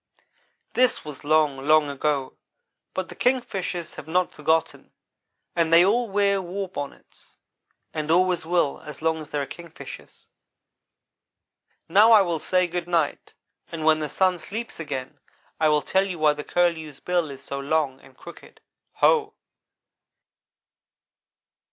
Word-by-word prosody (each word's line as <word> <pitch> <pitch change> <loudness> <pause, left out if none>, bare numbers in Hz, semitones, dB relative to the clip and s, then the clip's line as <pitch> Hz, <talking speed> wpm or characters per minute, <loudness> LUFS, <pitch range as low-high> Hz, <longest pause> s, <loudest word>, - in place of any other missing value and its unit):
"This 250 -8 +2
was 150 -3 -8
long, 150 -2 +3
long 155 +1 +4
ago, 140 -1 -2 0.6
but 185 0 -3
the - - -9
Kingfishers 195 -9 -1
have 145 - -9
not 180 +2 +1
forgotten, 160 0 -1 0.6
and 165 -1 +1
they 170 +2 +7
all 235 +3 +2
wear 200 -1 +2
war 190 +2 -4
bonnets, 145 -6 -9 0.6
and 155 0 -3
always 180 0 +3
will 170 -3 0
as 150 0 -10
long 160 0 +1
as 155 -1 -9
there 145 -2 -2
are - - -4
Kingfishers. 170 +2 -11 1.6
"Now 210 +7 +6
I 215 - +8
will 170 -3 -2
say 180 +3 +2
good 175 0 -4
night, 165 -4 -1 0.4
and 160 -2 -4
when 155 0 +5
the 150 -1 -3
sun 185 -2 +1
sleeps 220 +8 -6
again 135 -5 -5 0.4
I 155 -1 +4
will 150 -1 +2
tell 190 +1 +1
you 180 -3 -5
why 155 -1 +4
the 150 0 -7
curlew's 160 -5 0
bill 175 -3 0
is 135 -1 -10
so 140 - -5
long 140 -2 -1
and 135 -1 -19
crooked. 170 - -13 0.4
Ho!" 445 -2 +4
165 Hz, 145 wpm, -24 LUFS, 150-185 Hz, 1.6 s, I